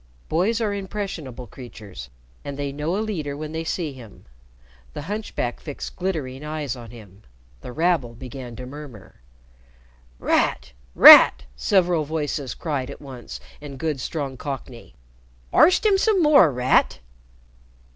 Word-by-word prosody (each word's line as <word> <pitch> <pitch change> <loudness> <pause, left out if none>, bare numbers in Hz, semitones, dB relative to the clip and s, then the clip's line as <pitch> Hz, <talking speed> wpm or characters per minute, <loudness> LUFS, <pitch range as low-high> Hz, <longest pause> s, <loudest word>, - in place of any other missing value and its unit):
Boys 195 +8 +1
are 215 -3 -1
impressionable 190 - -5
creatures, 105 - -11 0.3
and 140 -1 -6
they 140 -1 -3
know 150 +6 -2
a - - -1
leader 155 -9 -4
when 155 0 -6
they 160 +1 -3
see 165 -2 -3
him. 120 -6 -14 0.7
The - - -6
hunchback 205 - -4
fixed 145 -3 -7
glittering 150 -8 -4
eyes 150 -4 -4
on 120 -2 -10
him. 105 -4 -14 0.4
The - - -8
rabble 155 -6 0
began 125 0 -9
to 125 - -8
murmur. 130 - -11 1.0
"Rat! 65 - 0 0.2
Rat!" - - +10
several 175 - +2
voices 145 -4 -3
cried 140 -5 -3
at 140 - -9
once 125 - -9 0.2
in 140 -2 -9
good 150 0 -2
strong 140 -4 -4
Cockney. 130 -3 -7 0.6
"Arst 365 +5 +5
'im 400 -2 +4
some 400 -4 +3
more, 280 - +6
Rat!" 125 0 +2
145 Hz, 135 wpm, -23 LUFS, 125-170 Hz, 1.0 s, Rat